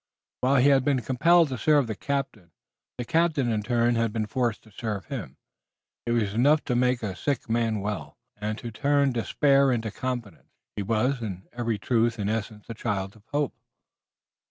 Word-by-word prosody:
While 130 +2 +2
he 135 +1 +5
had 135 -2 +4
been 135 -2 +1
compelled 165 +7 +4
to 130 -2 -4
serve 150 -3 +4
the 110 - -3
captain, 130 -7 -3 0.5
the 120 - -4
captain 160 -6 +1
in 110 -1 0
turn 120 +1 +2
had 115 -1 +1
been 110 -1 -1
forced 120 +1 -1
to 110 - -19
serve 105 -2 -4
him. 115 - -6 0.7
It 120 - +1
was 105 -4 0
enough 145 +7 +4
to 125 - -1
make 125 -1 +1
a 95 -3 -3
sick 135 +8 -2
man 115 -2 0
well, 95 -8 -5 0.2
and 105 +1 -3
to 120 -1 -7
turn 140 +3 +2
despair 135 +3 +3
into 115 -3 -1
confidence. 120 -5 -5 0.3
He - - -2
was 115 +6 0
in 95 -4 -6
very 115 -3 -1
truth 115 +3 +1
and 105 0 -1
essence 110 -1 -4
the 115 - -6
child 100 -3 -3
of 110 -1 -20
hope. 145 -1 -1
120 Hz, 185 wpm, -26 LUFS, 105-135 Hz, 0.7 s, he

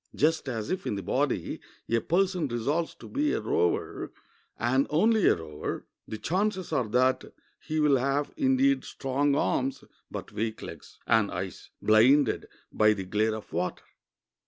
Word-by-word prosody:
Just 155 -2 +1
as 110 -4 -3
if, 185 0 -2
in - - -1
the 100 - -4
body, - - -1 0.3
a 115 - +2
person 180 -2 +1
resolves 140 +8 -1
to - - -12
be 295 +2 0
a - - 0
rower, 85 +1 -1 0.5
and 130 +4 +2
only 215 +7 +3
a - - +5
rower, 80 -3 -5 0.2
the 110 - -5
chances 185 - -1
are 125 -4 +1
that 130 +4 +2 0.4
he 155 0 -3
will 150 -3 +4
have, 140 +3 0
indeed, 275 -1 +3
strong 140 +1 0
arms, 135 -1 0 0.3
but - - -7
weak 110 0 -3
legs, - - -10
and 110 -3 +3
eyes - - -6
blinded 120 +5 +4 0.2
by 105 0 +4
the 100 -2 -5
glare 110 +3 +1
of 110 - -10
water. 90 +2 -2
135 Hz, 160 wpm, -28 LUFS, 110-170 Hz, 0.5 s, a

